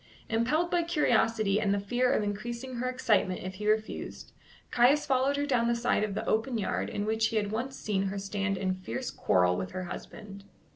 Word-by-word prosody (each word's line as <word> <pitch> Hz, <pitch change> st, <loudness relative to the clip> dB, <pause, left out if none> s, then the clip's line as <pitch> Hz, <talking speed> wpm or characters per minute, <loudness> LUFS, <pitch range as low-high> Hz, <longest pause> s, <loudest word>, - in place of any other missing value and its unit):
Impelled 290 Hz, +10 st, +1 dB
by 350 Hz, -, +3 dB
curiosity 225 Hz, -, +2 dB
and 205 Hz, -2 st, +1 dB
the 200 Hz, -, +2 dB
fear 245 Hz, +6 st, +1 dB
of 240 Hz, -, +2 dB
increasing 235 Hz, +5 st, -4 dB
her 255 Hz, +1 st, -1 dB
excitement 215 Hz, -8 st, +1 dB
if 185 Hz, +1 st, -5 dB
he 210 Hz, +2 st, -2 dB
refused, 215 Hz, 0 st, -2 dB, 0.4 s
Caius 260 Hz, +5 st, +4 dB
followed 270 Hz, +1 st, +2 dB
her 285 Hz, -, 0 dB
down 245 Hz, -5 st, +2 dB
the 235 Hz, -, +2 dB
side 235 Hz, -2 st, +1 dB
of 205 Hz, -2 st, -2 dB
the -, -, -3 dB
open 225 Hz, +3 st, 0 dB
yard 205 Hz, -, -1 dB
in 205 Hz, 0 st, -3 dB
which 220 Hz, +1 st, +1 dB
he 225 Hz, -, -4 dB
had 205 Hz, -2 st, 0 dB
once 255 Hz, +5 st, -3 dB
seen 195 Hz, -2 st, -1 dB
her 195 Hz, +1 st, -3 dB
stand 195 Hz, 0 st, -2 dB
in 185 Hz, 0 st, 0 dB
fierce 185 Hz, +8 st, -5 dB
quarrel 90 Hz, -1 st, +2 dB
with 90 Hz, -, -4 dB
her 185 Hz, -, -3 dB
husband. 200 Hz, +2 st, -8 dB
220 Hz, 205 wpm, -29 LUFS, 200-250 Hz, 0.4 s, Caius